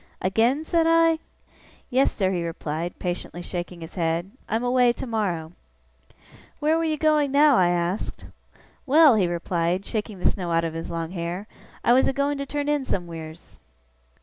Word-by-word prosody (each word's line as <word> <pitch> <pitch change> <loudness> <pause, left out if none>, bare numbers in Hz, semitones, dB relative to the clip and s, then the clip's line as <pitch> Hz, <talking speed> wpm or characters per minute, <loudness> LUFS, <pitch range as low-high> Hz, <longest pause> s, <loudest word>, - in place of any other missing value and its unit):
'Again?' 230 - +1
said 330 0 +2
I. 330 -1 +4 0.7
'Yes, 260 +2 +3
sir,' 190 -2 0
he 175 -2 -1
replied, 165 0 -4
patiently 175 -1 -4
shaking 175 -1 -6
his 165 +1 -9
head, 170 +1 -1 0.2
'I'm 225 +2 0
away 245 -1 +3
tomorrow.' 195 -11 -3 1.1
'Where 310 +1 +2
were - - 0
you 310 -1 0
going 305 -2 +2
now?' 290 0 +5
I 180 -6 +4
asked. 175 +2 -2 0.6
'Well!' 300 0 +7
he 200 -5 +2
replied, 175 +1 -1
shaking 215 -2 -4
the 180 - -6
snow 180 -3 -1
out 165 0 +2
of 165 -1 -2
his 165 0 -5
long 165 0 -4
hair, 175 +2 -4 0.4
'I 240 - +5
was 260 - +4
a - - +1
going 280 +1 0
to 280 - -4
turn 290 +1 -3
in 295 -2 +1
somewheers. 165 -6 -6
195 Hz, 170 wpm, -24 LUFS, 170-280 Hz, 1.1 s, Well